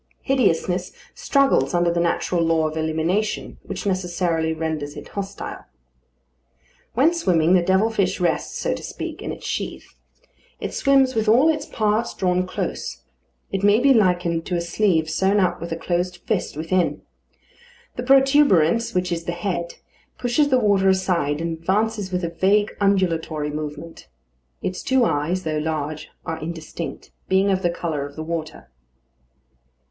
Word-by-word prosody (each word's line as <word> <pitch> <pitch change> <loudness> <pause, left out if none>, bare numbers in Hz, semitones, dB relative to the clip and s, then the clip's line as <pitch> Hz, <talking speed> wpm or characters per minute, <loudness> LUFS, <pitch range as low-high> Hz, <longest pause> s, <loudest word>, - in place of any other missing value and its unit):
Hideousness 185 -8 +1 0.2
struggles 270 - +2
under 175 0 +3
the 170 - 0
natural 170 +1 0
law 165 -1 +2
of 155 - -6
elimination, 160 +7 -1
which - - -6
necessarily 175 -4 0
renders 160 -2 -3
it - - -9
hostile. 200 0 -6 1.3
When 290 +8 +4
swimming, 180 - +2
the 185 - +5
devil 190 +5 +2
fish 195 -3 0
rests, 175 -2 -1
so - - -1
to - - -6
speak, - - -6
in - - -4
its - - -8
sheath. - - -4 0.7
It - - -4
swims 270 -2 +3
with 220 -1 +1
all 255 +8 +5
its 300 -2 -1
parts 215 +1 0
drawn 180 0 +1
close. 185 - -4 0.5
It 195 - -1
may 205 +2 +5
be 275 +2 +5
likened 175 -6 +2
to 180 - -1
a - - +1
sleeve 170 -2 +1
sewn 190 +6 +2
up 185 -4 +1
with 170 - -6
a - - 0
closed 175 +2 -2
fist 200 -8 -2
within. 170 +3 0 0.9
The - - -3
protuberance, 250 - +4
which 180 0 0
is 165 -1 -2
the 175 - -2
head, 175 -1 -3 0.4
pushes 255 +4 +1
the 260 - +4
water 200 -4 +3
aside 175 -6 +1
and 165 -1 -3
advances 205 +3 0
with 180 0 -1
a 170 - -1
vague 195 +5 +1
undulatory 165 -6 +1
movement. 150 - -7 0.6
Its 185 - -3
two 260 -2 +2
eyes, 165 +3 0
though 155 -1 -1
large, 155 -1 -3 0.2
are 160 0 -4
indistinct, 160 -2 -6 0.2
being 190 +1 +3
of 190 -1 +1
the 175 - +2
colour 165 -4 -3
of 145 - -15
the 155 - -5
water. 160 - -5
180 Hz, 155 wpm, -22 LUFS, 165-205 Hz, 1.3 s, the